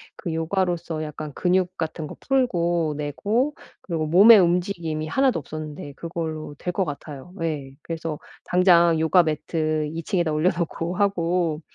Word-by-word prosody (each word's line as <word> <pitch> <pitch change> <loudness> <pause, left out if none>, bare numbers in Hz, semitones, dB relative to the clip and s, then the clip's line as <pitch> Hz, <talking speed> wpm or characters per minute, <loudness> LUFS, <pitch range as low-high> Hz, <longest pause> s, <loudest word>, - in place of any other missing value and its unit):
그 170 - -5
요가로써 170 -1 -1
약간 150 0 -6
근육 185 +2 0
같은 160 -1 -4
거 - - -9
풀고 175 - +1
내고 210 - -1 0.3
그리고 160 -4 -3
몸에 205 +7 +8
움직임이 170 -3 0
하나도 265 - +2
없었는데 150 -1 -7
그걸로 160 -2 -5
될 180 - -4
것 190 0 0
같아요. 145 +2 -8
예. 145 -4 -3
그래서 165 -2 -4 0.3
당장 170 -3 +4
요가 170 +3 +4
매트 155 0 -1
2 165 0 -5
층에다 175 -6 0
올려 155 +4 +2
놓고 170 +1 -3
하고 175 -5 +1
165 Hz, 300 characters per minute, -24 LUFS, 155-180 Hz, 0.3 s, 몸에